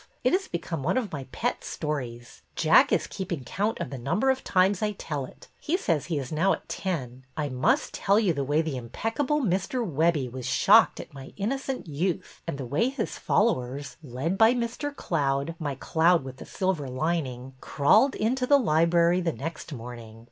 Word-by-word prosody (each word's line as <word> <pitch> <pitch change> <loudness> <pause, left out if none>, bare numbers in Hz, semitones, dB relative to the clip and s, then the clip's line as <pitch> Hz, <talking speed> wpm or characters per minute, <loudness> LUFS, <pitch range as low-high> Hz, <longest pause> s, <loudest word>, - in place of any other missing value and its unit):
It - - +3
has 380 +1 +1
become 170 -3 -4
one 170 - 0
of 240 -5 -1
my 140 -3 -5
pet - - -2
stories. 125 -6 -5
Jack - - +5
is - - +2
keeping 175 -7 -5
count 205 - -2
of 170 - -4
the 135 - -5
number 175 - +2
of 265 - -3
times 185 +1 +2
I 210 -1 0
tell 145 -8 -4
it. - - -16
He 335 +4 0
says 165 - 0
he 165 -4 -1
is 135 -2 -4
now 165 +5 +3
at - - -7
ten. 130 -9 -4
I 150 -2 -1
must 130 -1 +1
tell 200 +2 +3
you 200 -6 +2
the 140 -2 -2
way 145 +4 +1
the 155 -5 -3
impeccable 225 - -1
Mr. 220 +3 0
Webbie 155 -4 +1
was 130 -1 -6
shocked - - +5
at - - -9
my 135 -1 -10
innocent 265 +5 -2
youth, 165 +3 -3
and 165 - -3
the 135 - -5
way 150 - +1
his 265 -5 -4
follow 215 - +2
ers, 135 +3 -7
led 150 +7 -3
by 225 +2 +6
Mr. 245 +5 -2
Cloud, 140 - -1
— - - -36
my 145 -4 -3
cloud 165 +4 +2
with 130 0 -8
the - - -10
silver 185 -7 -1
lining, 130 -2 -2
— - - -30
crawled 160 - +3
into 250 +4 0
the 285 - +6
library 170 - +3
the 170 -2 0
next 165 +3 -6
morning. 115 -3 -8
165 Hz, 200 wpm, -27 LUFS, 135-205 Hz, -, by